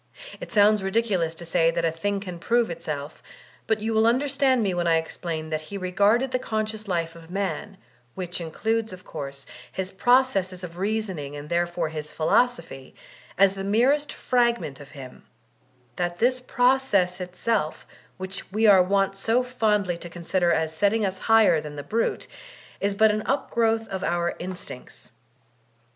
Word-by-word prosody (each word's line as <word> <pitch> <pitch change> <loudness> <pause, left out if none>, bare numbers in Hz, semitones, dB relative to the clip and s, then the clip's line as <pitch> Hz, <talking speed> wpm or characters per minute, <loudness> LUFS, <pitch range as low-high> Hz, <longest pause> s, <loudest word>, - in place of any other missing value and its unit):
It - - -8
sounds 210 -1 +5
ridiculous 190 -5 0
to 170 - -9
say 165 -1 +3
that 170 0 0
a 165 - +2
thing 200 +5 -2
can 180 -3 -7
prove 235 +2 +1
itself; 155 -3 -6 0.5
but 220 -1 +1
you 225 +1 -1
will 220 +1 +4
under 255 +5 +2
stand 265 -3 +2
me 195 -3 0
when 175 -1 0
I 165 -1 +4
explain 160 -1 -4
that 155 0 -3
he 200 - -5
r^arded 205 +7 +2
the 255 - 0
conscious 215 -2 -3
life 170 -3 -2
of 165 0 -13
man, 195 +1 -3 0.4
which 180 -1 -4
includes, 220 +7 -1
of 185 0 -11
course, 140 -1 -7 0.3
his 190 0 -4
processes 195 -6 +2
of 175 0 -8
reasoning 190 -8 -2
and 145 +1 -8
therefore 175 -1 0
his 155 -1 -6
philosophy, 160 - 0 0.4
as 195 +1 +5
the 195 -1 -5
merest 255 +9 +2
fragment 235 - 0
of 145 - -13
him; 130 -2 -11 0.7
that 175 -1 -2
this 250 +4 +2
process 250 -8 +2
itself, 180 -1 -2 0.3
which 190 +1 -6
we 215 +3 +1
are 200 -3 +8
wont 195 +1 +1
so 225 +5 +1
fondly 210 -8 0
to 175 - -8
consider 175 +1 0
as 160 0 0
setting 205 +4 +2
us 190 -1 -3
higher 220 -8 +6
than 150 -1 -8
the 145 - -6
brute, 230 +7 -1 0.5
is 200 0 0
but 220 +1 +5
an 215 0 -1
upgrowth 225 -4 +1
of 190 -1 -4
our 175 -2 0
instincts. 180 -7 -8
195 Hz, 165 wpm, -25 LUFS, 170-225 Hz, 0.7 s, are